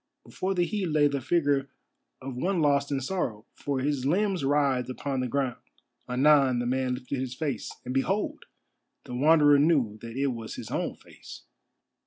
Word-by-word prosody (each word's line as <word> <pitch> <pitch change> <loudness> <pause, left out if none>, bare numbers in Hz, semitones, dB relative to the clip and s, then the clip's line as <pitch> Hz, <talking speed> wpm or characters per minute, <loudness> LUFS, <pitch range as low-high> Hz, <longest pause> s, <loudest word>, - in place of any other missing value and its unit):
Before 190 +1 -3
the 175 -1 +2
heap 190 0 -2
lay 150 -1 +4
the 140 -1 -2
figure 140 -3 +1 0.5
of 135 -1 -6
one 180 +8 0
lost 140 -2 +2
in 140 - 0
sorrow, 125 - -3
for 140 -2 -3
his 140 -1 -1
limbs 185 +4 +1
writhed 135 -3 +1
upon 135 +1 -3
the 130 - -1
ground. 130 -1 -2 0.5
Anon 135 0 +4
the 120 - -1
man 130 0 0
lifted 125 +1 -5
his 130 -1 -4
face, 140 -6 -3
and 125 - -3
behold! 190 +10 -1 0.6
the - - -8
Wanderer 145 +2 +5
knew 140 -9 +2
that 115 +1 -8
it 135 -1 +1
was 115 -2 -7
his - - -8
own - - -2
face. - - -13
140 Hz, 175 wpm, -27 LUFS, 130-150 Hz, 0.6 s, Wanderer